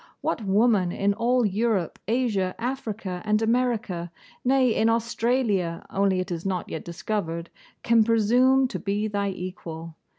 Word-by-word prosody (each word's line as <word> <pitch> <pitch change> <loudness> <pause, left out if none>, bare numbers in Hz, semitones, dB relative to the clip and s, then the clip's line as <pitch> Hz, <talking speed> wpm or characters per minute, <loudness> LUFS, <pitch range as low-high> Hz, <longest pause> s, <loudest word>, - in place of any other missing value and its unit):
What 225 - -1
woman 200 -2 +3
in 200 +2 +1
all 240 +3 +2
Europe, 205 -3 0
Asia, 215 -6 0
Africa, 220 -7 -4
and 215 0 +2
America, 225 -7 0 0.3
nay, 255 -2 +3
in 225 - +2
Australia, 230 -6 0
only 195 -1 +2
it 185 +1 -3
is 170 -1 -3
not 185 -2 -2
yet 160 - -5
discovered, 170 -1 -4 0.3
can 230 -1 +5
presume 245 +4 +4
to - - -4
be 205 +1 -1
thy 200 -1 -1
equal? 170 -3 -7
210 Hz, 140 wpm, -25 LUFS, 185-235 Hz, 0.3 s, can